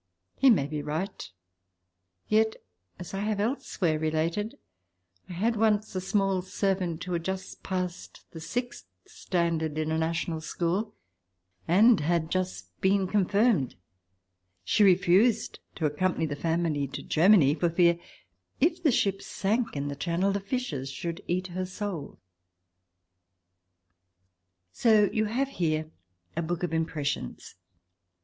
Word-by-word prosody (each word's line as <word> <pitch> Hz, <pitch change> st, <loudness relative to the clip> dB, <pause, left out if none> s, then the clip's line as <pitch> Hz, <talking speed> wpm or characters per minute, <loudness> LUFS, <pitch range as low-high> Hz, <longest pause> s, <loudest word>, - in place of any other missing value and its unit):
He 270 Hz, -, +5 dB
may 190 Hz, -, +4 dB
be 150 Hz, +1 st, -4 dB
right. 155 Hz, -, -4 dB, 1.0 s
Yet, 220 Hz, +1 st, +3 dB, 0.4 s
as 180 Hz, 0 st, -9 dB
I 195 Hz, -, -2 dB
have 210 Hz, 0 st, -1 dB
elsewhere 200 Hz, -, -1 dB
related, 160 Hz, +7 st, -1 dB, 0.7 s
I -, -, -6 dB
had 220 Hz, +7 st, 0 dB
once 215 Hz, -1 st, +1 dB
a 185 Hz, -, -1 dB
small 195 Hz, -1 st, +1 dB
servant 185 Hz, -3 st, -1 dB
who 180 Hz, -1 st, -4 dB
had 170 Hz, -1 st, -1 dB
just 190 Hz, +1 st, -5 dB
passed 180 Hz, -2 st, -5 dB
the 165 Hz, -, -8 dB
sixth 245 Hz, +9 st, -4 dB, 0.2 s
standard 170 Hz, -, -1 dB
in 155 Hz, 0 st, -1 dB
a 160 Hz, -, +1 dB
national 165 Hz, 0 st, -1 dB
school 180 Hz, +7 st, -2 dB, 0.7 s
and 210 Hz, +6 st, +6 dB
had 160 Hz, +1 st, 0 dB
just 135 Hz, -, -3 dB
been 195 Hz, 0 st, +3 dB
confirmed. 200 Hz, -, +2 dB, 0.9 s
She 215 Hz, -, +3 dB
refused 195 Hz, +4 st, +4 dB, 0.2 s
to 160 Hz, -, -2 dB
accompany 165 Hz, +3 st, 0 dB
the 145 Hz, -2 st, -3 dB
family 160 Hz, -2 st, 0 dB
to 140 Hz, +1 st, -7 dB
Germany 165 Hz, -4 st, +5 dB
for 170 Hz, +2 st, +1 dB
fear, 170 Hz, 0 st, +3 dB, 0.6 s
if 335 Hz, +4 st, +2 dB
the 310 Hz, -5 st, +4 dB
ship 195 Hz, -4 st, +1 dB
sank 225 Hz, +2 st, -1 dB
in 140 Hz, 0 st, -2 dB
the 140 Hz, -, -4 dB
Channel, 170 Hz, +6 st, 0 dB
the 200 Hz, -, -1 dB
fishes 195 Hz, -, -3 dB
should 165 Hz, +6 st, -5 dB
eat 180 Hz, +1 st, 0 dB
her 185 Hz, +1 st, -3 dB
soul.... 185 Hz, -5 st, -5 dB, 2.5 s
So 215 Hz, -, +4 dB
you 215 Hz, 0 st, +1 dB
have 255 Hz, +6 st, -1 dB
here 155 Hz, -, -1 dB, 0.4 s
a 170 Hz, -, 0 dB
book 170 Hz, +1 st, -3 dB
of 175 Hz, -, -1 dB
impressions. 155 Hz, -, -3 dB
180 Hz, 135 wpm, -28 LUFS, 160-205 Hz, 2.5 s, and